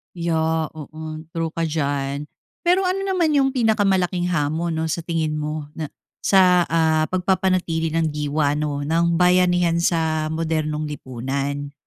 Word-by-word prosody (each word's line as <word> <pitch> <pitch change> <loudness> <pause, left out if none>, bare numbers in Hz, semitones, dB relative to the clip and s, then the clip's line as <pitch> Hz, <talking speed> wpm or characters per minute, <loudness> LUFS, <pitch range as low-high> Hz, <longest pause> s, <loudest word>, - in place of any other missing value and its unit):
Yeah, 160 -2 0
oo. 155 +1 -8
True 165 -1 -1
ka 165 - 0
diyan. 145 -2 -2 0.3
Pero 360 +2 +2
ano 370 +1 0
naman 365 -5 +1
yung 275 -2 +4
pinakamalaking 195 -7 +1
hamon, 160 0 -1
'no, 160 - -1
sa 160 +1 -2
tingin 160 -2 -1
mo 150 0 -5
na 155 -1 -5 0.3
sa, 185 -2 +5
ah, 160 -1 +2
pagpapanatili 185 -3 +1
ng 160 -1 0
diwa, 150 0 0
'no, 145 -1 -2
ng 170 +2 +1
bayanihan 180 -1 +3
sa 160 -2 +1
modernong 155 -1 -1
lipunan? 140 +1 -4
160 Hz, 135 wpm, -22 LUFS, 150-180 Hz, 0.3 s, sa